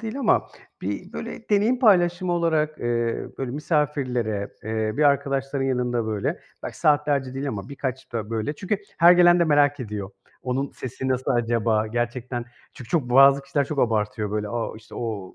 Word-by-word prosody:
değil 225 +3 -5
ama 245 -6 +2 0.3
bir - - -4
böyle - - -7
deneyim 215 +5 +3
paylaşımı 180 -6 +3
olarak, 160 -3 0
eee, 120 -1 -1
böyle, 135 -2 -3
misafirlere, 130 - -1
eee, 110 0 -1
bir - - +2
arkadaşların 140 -1 +1
yanında, 125 -3 0
böyle, 105 -2 -2 0.2
belki - - -7
saatlerce 145 -3 +2
değil 135 +2 -3
ama 100 -6 -5
birkaç 130 -2 -5
da 110 -2 -4
böyle 115 +5 -2
Çünkü 195 +5 -2 0.2
her 170 +1 +8
gelen 175 0 +6
de - - +5
merak 145 -2 +3
ediyor. 105 -4 -5 0.3
Onun 130 +2 -2
sesi 130 +1 -5
nasıl 130 0 0
acaba? 115 -2 +1
Gerçekten 120 +2 -3 0.3
Çünkü 125 -4 -12
çok 140 -8 0
bazı 135 +2 +6
kişiler 140 +1 0
çok 145 +1 -5
abartıyor, 110 -3 0
böyle, 105 0 -2
"A! 115 0 -3
işte, 110 0 -14
o! 105 -6 -5
130 Hz, 170 wpm, -24 LUFS, 115-150 Hz, 0.3 s, her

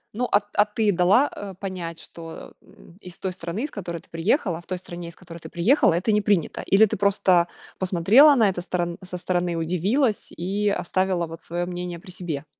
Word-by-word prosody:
Ну, 250 +1 0
а 205 - +5
т - - -28
а 205 - +4
ты 210 0 +1
дала, 195 +10 +4
а, 200 -1 -7
понять, 180 -4 -6
что, 165 -1 -10 0.5
из 180 -1 -12
той 185 -1 -3
страны, 175 +8 -5
из 300 - -4
которой 170 -4 -5
ты - - -23
приехала, 170 - 0
в - - -25
той 185 - -3
стране, 175 -1 -8
из 170 - -14
которой 170 -2 -11
ты 160 - -10
приехала, 195 - +3
это 185 +6 0
не 210 0 +3
принято, 200 -5 0
или 210 +3 +5
ты - - -3
просто 185 -3 +3 0.3
посмотрела 200 - +6
на 225 -4 +4
это 180 -2 -3
сторон 175 -1 -2
со 180 -1 -6
стороны, 175 -1 -1
удивилась 200 - 0
и 200 +4 -1
оставила 185 -2 0
вот 165 0 -10
свое 175 +1 -3
мнение 175 -1 -5
при 185 - -12
себе? 165 -5 -5
180 Hz, 205 wpm, -24 LUFS, 170-205 Hz, 0.5 s, посмотрела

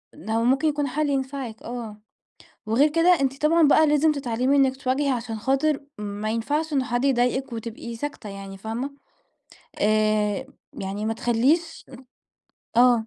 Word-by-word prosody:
هو 220 +4 -2
ممكن 270 +5 +2
يكون 290 -1 0
حل 295 +3 -1
ينفعِك 265 -4 -3
آه، 230 -3 -7 0.7
وغير 240 +8 +4
كده 335 +3 +4
أنتِ 270 +1 -1
طبعًا 315 -1 +5
بقى 310 +1 +5
لازم 300 +1 +3
تتعلمي 260 0 0
إنك 265 -1 +3
تواجهي 270 +2 0
عشان 230 -3 -3
خاطر 275 +5 +1 0.2
ما 210 +1 -4
ينفعش 295 +8 -1
إن 270 -3 +1
حد 245 +1 -1
يضايقِك 260 0 +1
وتبقي 230 +1 -6
ساكتة 290 -3 -6
يعني 195 -1 -8
فاهمة؟ 235 +7 -4 0.9
آآ 215 -1 +2 0.3
يعني 195 +2 -4
ما 225 - 0
تخليش 270 +10 +1 0.9
آه. 240 -2 +5
250 Hz, 140 wpm, -24 LUFS, 225-285 Hz, 0.9 s, طبعًا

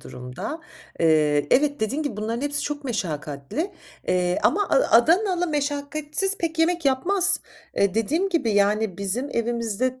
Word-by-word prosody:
durumda. 125 - -7 0.4
Eee, 150 -3 +3
evet, 285 +1 +3
dediğin 260 +8 -1
gibi 290 -8 -4
bunların 225 +3 -3
hepsi 290 0 -1
çok 295 -1 -4
meşakkatli. 175 - -3 0.4
Eee, 180 0 +1
ama 410 +5 +3
A - - +2 0.2
Adanalı 355 - +3
meşakkatsiz 295 +5 -2
pek 330 -1 -3
yemek 340 0 +2
yapmaz. 365 +9 +2 0.4
Eee, 200 -1 +2
dediğim 310 - +1
gibi 330 -11 0
yani 205 -1 +1
bizim 225 +8 -2
evimizde 235 +2 -1
260 Hz, 140 wpm, -24 LUFS, 205-320 Hz, 0.4 s, Eee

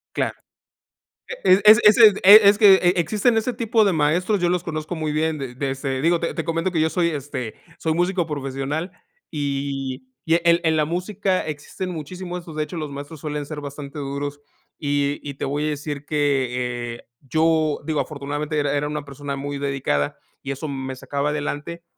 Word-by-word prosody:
Claro, - - -1 1.1
e 190 - +5
es 215 0 +9
es 210 0 +7
ese 230 -2 +10 0.2
e 205 +3 +10
es 205 - +3
que 205 -3 +8
e 180 -2 +3
e - - +3
existen 215 +7 +2
ese 225 +3 0
tipo 225 -1 +2
de 195 - +2
maestros, 170 +7 +1
yo 175 - +2
los 180 -1 0
conozco 155 +1 -4
muy 155 -2 -2
bien, 155 +1 0
de 130 -3 -6
de, 135 +1 -2
este 135 -1 -3
digo, 170 +2 +3
te 170 - -2
te 165 - -3
comento 165 +3 -1
que 165 -3 +1
yo 160 - +2
soy, 170 0 +1
este 140 -6 -5 0.2
soy 160 - 0
músico 175 +1 +1
profesional, 145 +3 -3 0.4
y 140 -3 -3 0.2
y 165 - +3
en 170 0 +5
en 160 -1 +2
la 155 - +2
música 185 +3 -1
existen 155 +5 -5
muchísimos 180 +3 -6
estos, 165 -2 -11
de 155 - 0
hecho, 170 +3 -7
los 155 -3 -4
maestros 145 +3 -8
suelen 150 0 -4
ser 150 0 -7
bastante 140 0 -7
duros, 140 +1 -4 0.4
y 145 -1 0
y 140 - -5
te - - -4
voy 145 +2 -1
a - - 0
decir 145 -1 -5
que, 125 -5 -1
eh, - - -16
yo 155 +1 +1
digo, 155 -2 -1
afortunadamente 145 +1 -3
era 145 -1 0
era 145 +1 0
una 150 -1 -4
persona 140 0 -6
muy 140 +1 -4
dedicada 135 - -1 0.2
y 140 - -5
eso 140 +3 -5
me 135 -2 -5
sacaba 140 +3 -2
adelante, 150 +3 -4
150 Hz, 200 wpm, -22 LUFS, 140-170 Hz, 1.1 s, ese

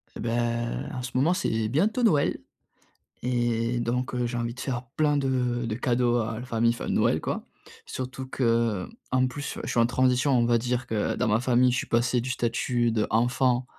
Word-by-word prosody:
Et - - -8
beh, 115 +1 -1 0.6
en 125 - -4
ce 130 - -5
moment, 145 +7 +3
c'est 115 -12 -1
bientôt 205 - +1
Noël 155 -11 +3 0.8
et 120 -1 0
donc, 125 +2 -2
heu, 125 -1 0
j'ai 120 0 -4
envie 115 0 -2
de 130 - -12
faire 125 -1 -3
plein 150 -1 +2
de 125 -3 0
de 110 -2 -2
cadeaux 120 0 +1
à 110 -1 -3
la 125 - -7
famille. 115 -1 +1
Enfin, 120 - -5
Noël - - +2
quoi. - - -4 0.4
Surtout 130 +1 -5
que, 115 -6 0 0.2
en 130 0 +3
plus, 140 +3 -6
je - - -4
suis - - +1
en 115 - +4
transition. 130 +2 +2
On 120 - +3
va 120 0 +3
dire 125 +2 -1
que 110 -3 -1
dans - - 0
ma 105 +1 +3
famille, 125 0 +3
je 125 - 0
suis - - -3
passé 120 +1 +1
du 125 - -5
statut 120 -1 0
d'enfant 120 +3 +1
125 Hz, 200 wpm, -26 LUFS, 115-130 Hz, 0.8 s, en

